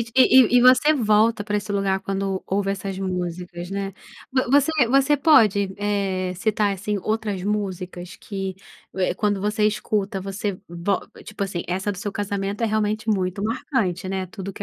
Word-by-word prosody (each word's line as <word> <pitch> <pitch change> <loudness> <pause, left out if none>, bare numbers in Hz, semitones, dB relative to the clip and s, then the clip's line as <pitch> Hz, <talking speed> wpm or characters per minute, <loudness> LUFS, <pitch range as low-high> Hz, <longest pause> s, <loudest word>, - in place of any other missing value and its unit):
e 260 - +7 0.3
e - - +8
e - - +5
você 255 +5 +6
volta 220 -3 +3
pra 210 0 -1
esse 205 0 -3
lugar 195 -1 0
quando 195 -1 -2
ouve 195 0 0
essas 195 -1 -5
músicas, 180 -1 -4
né. 195 0 -3 0.4
Vo 260 -2 +1
você 285 +3 +4 0.2
você 275 +3 +4
pode, 215 - +4
eh, 195 -3 -1
citar, 205 +1 +1
assim, 205 +2 -3
outras 215 -3 -2
músicas 185 -3 -4
que, 195 -2 -5 0.4
eh, 185 -1 +1
quando 205 -2 0
você 210 +1 +1
escuta, 210 -2 -1
você 195 0 -4
vol 175 +3 -1 0.2
tipo 215 -1 -6
assim, 185 -3 -4
essa 190 +3 -1
do - - -9
seu 205 0 -4
casamento 200 0 -3
é - - +3
realmente 215 0 -1
muito 190 -1 -1
marcante, 215 - -1
né, 190 -1 -2
tudo 195 +1 -7
que - - -7
200 Hz, 170 wpm, -23 LUFS, 190-215 Hz, 0.4 s, e